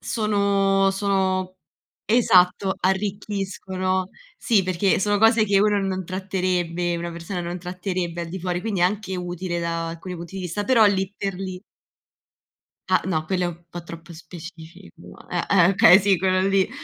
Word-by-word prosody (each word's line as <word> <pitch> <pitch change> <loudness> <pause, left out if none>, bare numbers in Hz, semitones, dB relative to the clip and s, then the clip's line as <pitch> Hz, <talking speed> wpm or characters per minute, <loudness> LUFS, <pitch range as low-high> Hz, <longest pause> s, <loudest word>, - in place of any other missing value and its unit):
sono 200 -2 +1
sono 190 -2 -1 0.5
esatto, 190 -4 +3
arricchiscono. 190 -1 -2 0.3
Sì, 220 -5 +2
perché 185 +1 +1
sono 205 +1 +1
cose 225 0 +5
che 200 -1 +2
uno 210 -1 +2
non 190 -1 -2
tratterebbe 180 -2 -2
una 170 0 -4
persona 170 +2 -5
non 175 +1 -5
tratterebbe 180 -1 -4
al 170 - -7
di 190 +3 -6
fuori, 180 0 -2
quindi 200 -3 -3
è - - +5
anche 190 0 -2
utile 180 0 -4
da 165 0 -2
alcuni 170 +2 -7
punti 170 +3 -9
di 190 - -5
vista, 180 +3 -3
però 230 -1 +5
lì 195 -1 0
per 195 -1 -3
lì 185 -1 -6 1.3
Ah, - - +3
no, 155 -4 -1
quello 185 +1 -1
è - - 0
un 170 0 -8
po' 175 +1 -8
troppo 170 0 -11
specifico. 170 +2 -13
Eh, - - -2
eh 180 -2 +5
okay, 185 -1 +7
sì, 195 -2 +2
quello 185 0 +1
lì: 195 -1 +2
185 Hz, 165 wpm, -23 LUFS, 175-195 Hz, 1.3 s, okay